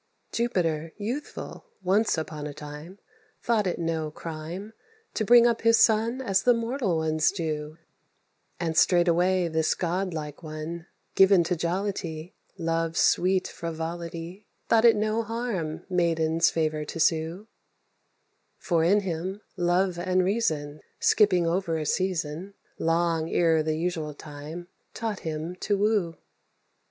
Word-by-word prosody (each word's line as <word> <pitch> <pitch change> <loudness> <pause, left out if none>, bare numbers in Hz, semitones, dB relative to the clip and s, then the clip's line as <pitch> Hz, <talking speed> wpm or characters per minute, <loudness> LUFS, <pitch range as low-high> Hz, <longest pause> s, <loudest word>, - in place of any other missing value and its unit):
Jupiter 165 -9 -1
youthful, 235 +8 -6 0.2
once 195 +2 +2
on 155 -2 -4
a 145 - -8
time, 150 +5 -9 0.5
Thought 220 -4 +2
it 180 - -1
no 165 -2 -2
crime 165 +7 -7 0.4
To 220 - -1
bring 235 +2 +7
up 235 -1 +2
his 230 0 +5
son 230 +4 +3
as 195 -5 +2
the 245 +3 +4
mortal 230 -6 -1
ones 155 -1 +2
do; 155 -4 -4 0.8
And 165 -2 -2
straightway 175 +1 +3
this 160 -1 +1
godlike 170 -4 -3
one, 160 +2 -6 0.3
given 190 -2 +6
to 180 +2 -1
jollity, 170 -1 -3 0.2
Love's 165 -1 -1
sweet 185 +1 +3
frivolity, 170 +3 -6 0.2
Thought 230 0 +5
it 230 - +7
no 215 +2 0
harm 225 -8 -3
maiden's 165 -3 +2
favour 155 -2 -1
to 160 +2 -7
sue, 165 +5 0 1.1
For 170 -3 +1
in 200 +5 +4
him 185 +2 -4
love 175 0 +1
and 185 +1 +1
reason, 155 -8 -1 0.2
Skipping 185 -5 +4
over 170 -1 0
a 155 - -3
season, 180 +1 -2 0.2
Long 165 -1 +1
ere 165 -2 +3
the 155 0 -1
usual 160 -3 -2
time, 150 +4 -9 0.3
taught 220 -3 -3
him 160 +2 -4
to 205 +1 0
woo. 200 -5 +1
175 Hz, 130 wpm, -26 LUFS, 160-195 Hz, 1.1 s, bring